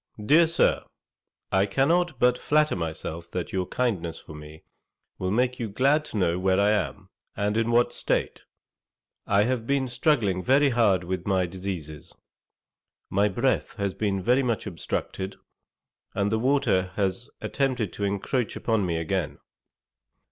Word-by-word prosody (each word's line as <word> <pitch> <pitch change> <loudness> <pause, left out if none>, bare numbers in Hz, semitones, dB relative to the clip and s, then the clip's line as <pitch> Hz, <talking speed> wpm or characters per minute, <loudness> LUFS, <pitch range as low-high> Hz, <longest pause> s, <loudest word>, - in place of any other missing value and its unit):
'DEAR 160 +7 +6
SIR, 170 - +2 0.7
'I 95 0 +3
cannot 160 - +1
but 125 0 +4
flatter 150 +3 +2
myself 85 0 -5
that 90 -2 -4
your 95 -2 -1
kindness 90 -10 -1
for - - -12
me 75 +1 -11 0.6
will 95 - -1
make 125 +4 +1
you 115 -3 -3
glad 140 +8 +2
to 110 - -6
know 90 -2 +1
where 95 0 +2
I 100 +1 +4
am, 90 -11 -2 0.3
and 105 +1 0
in 115 +1 +1
what 120 +1 +3
state. - - -2 0.8
'I 100 0 +4
have 120 -1 -1
been 140 -1 +1
struggling 120 - +1
very 140 +6 +4
hard 105 -8 +3
with 90 +1 -4
my 95 -2 +2
diseases. 90 -5 -7 1.0
My 100 +2 +3
breath 120 +7 0
has 100 -3 -2
been 100 -3 -1
very 125 +5 +3
much 120 -4 -1
obstructed, 95 +1 -4 0.8
and 100 +1 0
the 110 - +1
water 110 -8 +1
has 100 +4 -2
attempted 125 -8 -1
to 100 - -5
encroach 100 +4 -1
upon 110 -3 0
me 85 -1 -1
again. 80 -3 -2
100 Hz, 150 wpm, -26 LUFS, 95-125 Hz, 1.0 s, DEAR